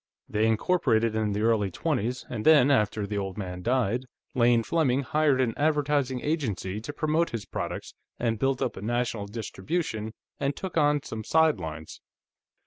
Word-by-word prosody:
They 110 +1 +1
incorporated 115 -2 +2
in 110 -2 0
the 105 - -1
early 110 -3 +2
twenties, 125 - -2
and 110 -3 -4
then, 145 -3 +6
after 105 -4 +2
the 100 0 -2
old 95 -2 -4
man 90 -3 -5
died, 125 +2 0 0.3
Lane 120 -1 +4
Fleming 140 -2 +1
hired 150 -1 +2
an 120 -3 +1
advertising 145 -4 +1
agency 110 - -2
to 120 - -5
promote 155 +3 +1
his 115 -5 -5
products, - - -5 0.2
and 115 -2 -1
built 135 0 +1
up - - -2
a - - -8
national 115 -2 -1
distribution, 110 - -3 0.2
and 140 0 0
took 190 -2 -6
on 145 -2 +3
some 110 0 -6
sidelines. 90 - 0
120 Hz, 160 wpm, -27 LUFS, 105-145 Hz, 0.3 s, then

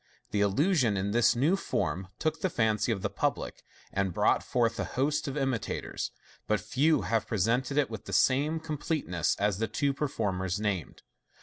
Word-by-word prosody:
The 100 0 +1
illusion, 120 - +2
in 100 +2 -1
this 120 +2 +4
new 145 +10 +3
form, 95 - -2
took 155 - -1
the 185 - +1
fancy 110 -4 +1
of 100 -4 -2
the - - 0
public, - - -2 0.3
and 95 -3 -1
brought - - +3
forth 115 -2 0
a - - +1
host 145 +4 -1
of 140 +1 -3
imitators 135 -5 -2
j - - -36 0.3
but 105 -1 +2
few 130 +10 +2
have 115 -1 0
presented 120 +7 0
it 140 -5 +2
with 110 -1 -7
the - - -7
same 145 +5 +3
completeness 150 - -1
as 100 -1 0
the 115 - 0
two 140 +3 0
performers 100 - -1
named. 100 -5 -3
115 Hz, 180 wpm, -29 LUFS, 100-140 Hz, 0.3 s, this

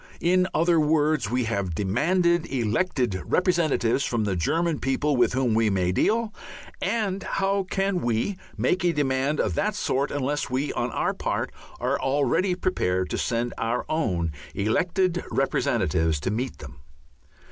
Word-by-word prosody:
In 180 +2 +3
other 170 0 +3
words, 150 -5 +2
we 125 +1 +1
have 100 -7 -2
demanded 170 - +1
elected 120 - 0
representatives 160 -9 +1
from 115 -2 0
the 100 -3 0
German 160 - 0
people 140 +2 0
with 125 - +3
whom 125 -3 +1
we 110 0 +3
may 90 -2 +1
deal, 220 - +1 0.5
and 195 -1 -1
how 195 +1 0
can 195 -2 0
we 120 - 0 0.2
make 185 0 +1
a 175 -1 +3
demand 140 0 0
of - - +1
that 205 +1 0
sort 140 -7 0
unless 145 +1 -2
we 130 +3 -1
on 120 +1 -1
our - - -1
part - - -2 0.3
are - - 0
already 145 +7 +1
prepared 95 - -1
to - - -1
send 120 0 -1
our 115 +2 -1
own 90 - 0 0.2
elected 175 - +1
representatives 80 -1 +1
to 95 - -1
meet 125 +5 -3
them? 75 0 -11
140 Hz, 150 wpm, -25 LUFS, 115-175 Hz, 0.5 s, In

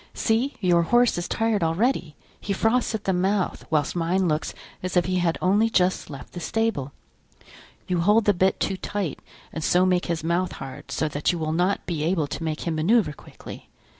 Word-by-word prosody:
See! 235 +5 0
your 175 -3 +4
horse 240 +3 +3
is 175 - -4
tired 225 -3 0
already, 165 - 0 0.2
he 200 - -3
froths 225 +3 +1
at 215 - -5
the 190 - +1
mouth, 190 +2 0
whilst 155 -1 0
mine 175 +2 +1
looks 155 -1 -1 0.3
as 185 0 -2
if 175 - +3
he 185 0 0
had 175 -2 +1
only 205 +5 +3
just 185 -3 +1
left 140 -3 -10
the 175 - -6
stable. 225 -8 -1 1.0
You 180 -2 0
hold 210 +5 +4
the 205 - +4
bit 190 +1 +1
too 190 - -1
tight 195 -6 -3 0.3
and 160 - -4
so 180 +3 +3
make 180 -1 +1
his 170 -2 -2
mouth 170 +2 0
hard, 135 -1 -9
so 160 - -1
that 145 0 0
you 175 - -3
will 155 -1 -2
not 180 +4 0
be 165 -4 -3
able 165 -1 +1
to 145 - -6
make 155 -1 -3
him 170 - -2
manoeuvre 185 0 +2
quickly. - - -12
180 Hz, 200 wpm, -24 LUFS, 165-205 Hz, 1.0 s, your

